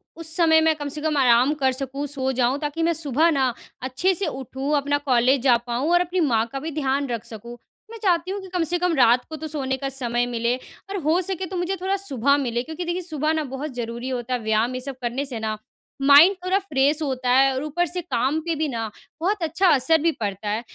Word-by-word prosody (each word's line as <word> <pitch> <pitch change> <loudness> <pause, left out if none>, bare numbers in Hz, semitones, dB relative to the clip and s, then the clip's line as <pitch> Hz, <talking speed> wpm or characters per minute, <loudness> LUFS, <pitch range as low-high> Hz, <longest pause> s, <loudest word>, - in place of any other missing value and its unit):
उस 330 -1 -3
समय 320 -2 +5
मैं 320 0 +3
कम 290 -1 -5
से 300 - -5
कम 305 -1 0
आराम 250 +1 +4
कर 265 -1 +3
सकूँ, 275 +2 -4
सो 265 -2 -1
जाऊँ 255 +2 +1
ताकि 295 +2 -2
मैं 335 +1 +2
सुबह 315 +1 +2
ना 265 -4 +1 0.3
अच्छे 265 +9 0
से 375 +1 -1
उठूँ, 270 +1 -3
अपना 285 0 +1
कॉलेज 260 -1 +2
जा 250 -3 +5
पाऊँ 245 +6 -1
और 350 0 +5
अपनी 360 +1 -1
माँ 225 -1 +2
का 275 - -4
भी 315 +4 -5
ध्यान 280 -1 -1
रख 230 -2 -3
सकूँ। 235 +1 -9 0.3
मैं 460 - -8
चाहती 355 -1 +1
हूँ 400 - -3
कि 380 - -10
कम 360 -2 +1
से 345 +2 -1
कम 360 -1 +1
रात 245 -2 +4
को 315 - -6
तो 315 0 -6
सोने 270 -3 -2
का 275 +1 -3
समय 245 -3 -1
मिले। 235 0 -1 0.3
और 395 - -3
हो 315 +4 +3
सके 375 0 -3
तो 370 +1 -5
मुझे 355 +2 -1
थोड़ा 385 +1 0
सुबह 280 - +1
मिले 240 -4 -1
क्योंकि 320 +5 -6
देखिए 345 +2 -2
सुबह 310 -3 -1
ना 315 -1 -1
बहुत 270 +1 -6
ज़रूरी 235 +1 -4
होता 250 -1 -3
है 250 - 0
व्यायाम 220 +3 +1
ये 255 - -4
सब 270 +1 -6
करने 245 +4 -2
से 255 -5 -5
न 215 0 -2 0.5
माइंड 290 +8 +8
थोड़ा 370 +1 +2
फ्रेश 295 -4 +1
होता 260 -4 -2
है 270 +1 +5
और 260 +2 -3
ऊपर 320 +4 0
से 355 +2 -4
काम 285 -2 0
पे 335 +1 -2
भी 310 0 -1
ना 230 -5 -3 0.3
बहुत 385 +1 0
अच्छा 330 +4 +1
असर 295 +2 +4
भी 335 +1 +3
पड़ता 205 -5 -4
है। 215 +2 -1
280 Hz, 245 wpm, -23 LUFS, 250-325 Hz, 0.5 s, माइंड